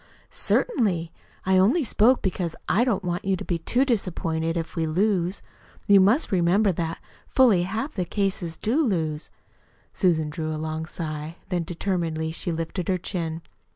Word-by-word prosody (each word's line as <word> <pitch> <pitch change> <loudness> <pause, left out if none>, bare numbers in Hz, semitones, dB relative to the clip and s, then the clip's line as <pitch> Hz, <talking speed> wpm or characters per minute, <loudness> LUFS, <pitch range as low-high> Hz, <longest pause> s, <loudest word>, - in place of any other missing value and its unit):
"Certainly. 190 - +1 0.3
I 190 0 +4
only 245 - +4
spoke 245 +1 +3
because 180 -3 -2
I 215 +6 +3
don't 210 -6 0
want 175 0 -2
you 195 0 +1
to - - -7
be 170 -2 -1
too 245 +11 +1
disappointed 165 -8 -1
if 165 -1 -2
if - - -17
we 160 -1 0
lose. 185 +2 0 0.4
You 200 -1 +7
must 215 +11 +3
remember 190 +3 +3
that 165 -1 -3 0.3
fully 235 -9 +4
half 220 - -2
of - - -29
the 180 - 0
cases 185 -3 -2
do 260 +9 +1
lose." 160 - -1 0.6
Susan 160 -5 +1
drew 155 0 -3
a 155 - -3
long 160 +1 -4
sigh. 155 -1 -5
Then, 180 -3 0
determinedly 165 -3 -2
she 170 +1 -4
lifted 165 +2 -3
her 185 -2 +2
chin. 165 -3 -4
180 Hz, 170 wpm, -25 LUFS, 165-200 Hz, 0.6 s, You